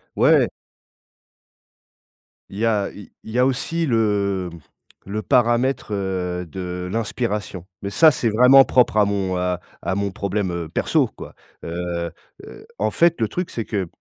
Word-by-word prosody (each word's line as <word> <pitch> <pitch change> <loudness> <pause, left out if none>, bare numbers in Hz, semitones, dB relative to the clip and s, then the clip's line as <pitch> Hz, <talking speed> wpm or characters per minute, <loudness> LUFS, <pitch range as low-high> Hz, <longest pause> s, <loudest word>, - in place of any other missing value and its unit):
Ouais. - - +4 2.0
Il 100 - -8
y 115 - 0
a 105 -3 +1
il 105 - -12
il 110 - -9
y 120 - -2
a 125 - +5
aussi 160 +6 -1
le 100 - 0 0.6
le 105 +2 -3
paramètre, 120 -1 +1
heu, 90 -2 -2
de 90 +1 -6
l'inspiration. 105 -4 -3 0.2
Mais 100 - -4
ça 160 +7 +6
c'est 120 -3 0
vraiment 125 +5 +7
propre 125 -4 +3
à 105 - +5
mon, 95 -2 -1
heu, 90 0 -1 0.2
à 85 +3 -2
mon 100 0 -1
problème, 100 0 -2
heu, 85 -2 -4
perso - - +1
quoi. - - -10 0.3
Heu 85 0 -4 0.3
heu, 425 - -12
en - - +1
fait, 170 0 +3
le 110 - +2
truc 180 - -4
c'est 115 - -4
que, 100 -5 -2
100 Hz, 160 wpm, -22 LUFS, 90-120 Hz, 2.0 s, vraiment